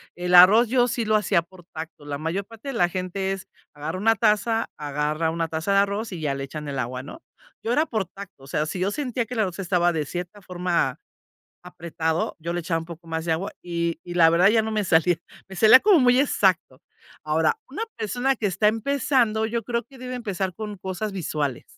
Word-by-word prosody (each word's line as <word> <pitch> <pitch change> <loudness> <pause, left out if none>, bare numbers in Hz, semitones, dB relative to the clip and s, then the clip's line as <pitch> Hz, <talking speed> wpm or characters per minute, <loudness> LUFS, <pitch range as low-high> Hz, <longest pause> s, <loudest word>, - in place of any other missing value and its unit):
el 180 0 +1
arroz 205 +7 +8
yo 245 0 +3
sí 235 -1 -2
lo 215 0 +2
hacía 205 -5 +2
por 175 +1 -18
tacto. 160 -2 -8
La 145 -1 -4
mayor 165 +6 -2
parte 225 +4 -13
de 275 - -3
la 175 -6 +3
gente 185 +2 -3
es 195 -1 -5 0.3
agarra 150 +4 -5
una 225 +3 +3
taza, 220 +2 +1
agarra 150 +2 -1
una 165 0 -2
taza 160 +5 -2
de 195 - +5
arroz 200 +2 -1
y 170 -3 -6
ya 140 -3 -1
le 135 - -4
echan 150 +2 -7
el 140 -1 -4
agua, 125 0 -3
¿no? 320 - -11 0.4
Yo 230 - 0
era 310 +3 +2
por 215 -4 -1
tacto, 195 -4 -12
o 135 - -13
sea, 150 +2 -1
si 180 - -4
yo 190 +2 0
sentía 250 -1 -2
que 250 - -8
el 230 - -3
arroz 185 -5 -1
estaba 180 -2 +1
de 155 -3 -2
cierta 180 +6 -6
forma 175 -7 -1 0.7
apretado, 170 -2 -3
yo 170 +1 -4
le 175 - -1
echaba 165 0 -1
un 165 - -7
poco 170 0 -11
más 160 0 -3
de 165 - +2
agua 170 +5 -3
y 170 -1 -2
y 175 - -8
la 165 -2 +6
verdad 175 +4 +5
ya 220 0 +4
no 220 - -3
me 215 -2 0
salía, 170 0 +3 0.3
me 190 - -10
salía 220 +6 +8
como 400 -5 +5
muy 250 -1 +4
exacto. 190 - +1 0.4
Ahora, 155 +1 +1
una 290 +12 -5 0.2
persona 245 +5 0
que 215 - -1
está 195 +3 +2
empezando, 230 -1 +1
yo 230 +1 -2
creo 235 0 -1
que 265 +3 -17
debe 255 0 -6
empezar 195 -6 -3
con 210 -2 -6
cosas 190 +3 -4
visuales, 150 -8 -3
185 Hz, 225 wpm, -24 LUFS, 165-220 Hz, 0.7 s, arroz